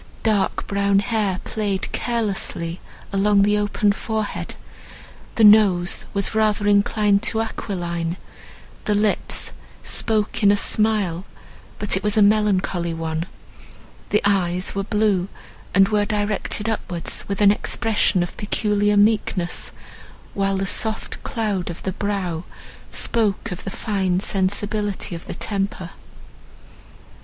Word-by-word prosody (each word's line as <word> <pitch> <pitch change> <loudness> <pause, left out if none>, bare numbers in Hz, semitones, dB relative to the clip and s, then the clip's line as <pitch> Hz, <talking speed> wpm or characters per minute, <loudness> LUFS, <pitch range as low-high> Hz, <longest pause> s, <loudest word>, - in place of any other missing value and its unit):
Dark 215 -3 +1
brown 200 0 +1
hair 200 -2 0
played 205 -3 -2
carelessly 200 -7 -1 0.3
along 200 0 +3
the 210 +1 +3
open 205 0 +1
forehead; 215 0 -3 0.8
the 225 - +2
nose 205 -4 +5
was 200 +1 0
rather 215 -1 +1
inclined 205 0 +3
to 230 -1 +1
aquiline; 175 -6 -3 0.7
the 210 - +1
lips 205 0 +1 0.3
spoke 215 -1 0
in 200 -1 +6
a 205 - +3
smile, 205 -6 +1 0.5
but 205 -1 +1
it 190 - -1
was 210 +1 0
a 210 - +6
melancholy 195 -5 +1
one; 165 +1 -3 0.8
the 210 - +2
eyes 185 -2 +1
were 195 - -1
blue, 210 -3 +1 0.5
and 195 0 +5
were 210 -1 +2
directed 210 0 -1
upwards 180 -6 -2
with 200 -1 -3
an 205 -1 +6
expression 210 -3 +1
of 175 - -7
peculiar 210 -1 +1
meekness, 205 -4 +1 0.6
while 195 -1 0
the 195 - -1
soft 220 +3 -1
cloud 205 -6 -2
of 170 - -7
the 190 - -1
brow 190 -5 -2 0.5
spoke 220 -1 0
of 180 - -6
the - - -4
fine 190 -3 -1
sensibility 205 +1 0
of 170 - -8
the - - -5
temper. 195 -4 -3
200 Hz, 125 wpm, -22 LUFS, 190-210 Hz, 0.8 s, in